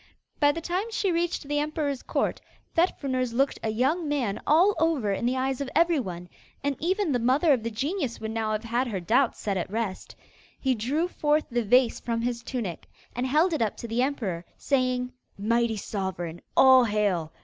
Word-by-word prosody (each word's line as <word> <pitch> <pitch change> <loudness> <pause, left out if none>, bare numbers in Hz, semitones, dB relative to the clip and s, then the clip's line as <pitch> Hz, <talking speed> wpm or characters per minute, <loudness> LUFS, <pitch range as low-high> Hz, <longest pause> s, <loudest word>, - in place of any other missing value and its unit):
By 290 -1 +5
the 330 +3 -5
time 365 +7 -2
she 410 -4 0
reached 340 0 -1
the 290 0 0
emperor's 295 -3 -2
court, - - -1 0.3
Fet 345 +3 +2
Fruners 255 -4 -1
looked 270 +3 +1
a 220 - -1
young 280 +9 0
man 245 -9 -1
all 350 +7 +5
over 305 -10 +1
in 235 +5 -1
the 255 +1 0
eyes 265 +1 -1
of 275 - -3
everyone; 260 - +1 0.4
and 285 0 0
even 375 +1 0
the 250 - +1
mother 270 +6 +3
of 250 - 0
the 230 - -3
genius 270 - -2
would 220 0 -4
now 220 -1 -1
have 215 +1 -2
had 240 +3 0
her 205 -5 -3
doubts 235 +8 +2
set 200 -2 -1
at 180 - -3
rest. 210 -2 -4 0.4
He 265 -1 +1
drew 270 +9 0
forth 305 -3 +1
the 240 0 +1
vase 245 +3 +3
from 230 -1 -2
his 240 -1 -2
tunic 230 -9 -5 0.3
and 245 +2 -1
held 315 +6 +3
it 310 - -1
up 220 -3 0
to 235 - -6
the 230 +2 0
emperor, 220 -11 -2
saying: 255 -2 0 0.2
'Mighty 230 +2 +1
Sovereign, 185 -5 -4 0.2
all 260 -2 +8
hail! 200 -7 0
255 Hz, 195 wpm, -26 LUFS, 220-295 Hz, 0.4 s, all